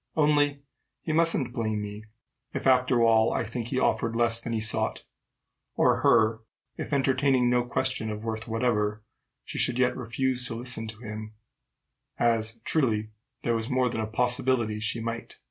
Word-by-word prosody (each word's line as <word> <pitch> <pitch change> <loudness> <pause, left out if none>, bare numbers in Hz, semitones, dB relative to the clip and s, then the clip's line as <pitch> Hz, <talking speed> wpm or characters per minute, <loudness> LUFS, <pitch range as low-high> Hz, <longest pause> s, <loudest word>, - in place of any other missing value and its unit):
Only 145 -2 +2 0.4
he 155 - -2
mustn't 160 -6 +2
blame 110 -3 -1
me, 105 +1 -7 0.5
if, - - -3
after 125 -2 +4
all, 115 0 +4
I - - 0
should 115 0 -10
think 120 -2 -3
he 130 - -2
offered 115 -2 +1
less 115 -1 +2
than 115 - -5
he 115 - 0
sought; 110 0 -1 0.7
or - - +3
her, 110 0 +3 0.4
if, - - -6
entertaining 135 -2 +2
no 125 0 +3
question 120 -2 -1
of 105 0 -5
worth 110 0 -4
whatever, 110 -2 0 0.4
she - - -5
should 125 - +2
yet 125 -1 +2
refuse 125 +1 -2
to 115 - -5
listen 120 -1 -3
to 110 0 -10
him 110 0 -7 0.8
as, 115 -1 +1
truly, 110 -8 +1 0.3
there 120 - +1
was 115 0 -3
more 130 -1 +2
than 110 -2 -3
a 110 - -2
possibility 120 -1 0
she 110 +2 -1
might. 115 +1 -5
115 Hz, 170 wpm, -27 LUFS, 110-130 Hz, 0.8 s, after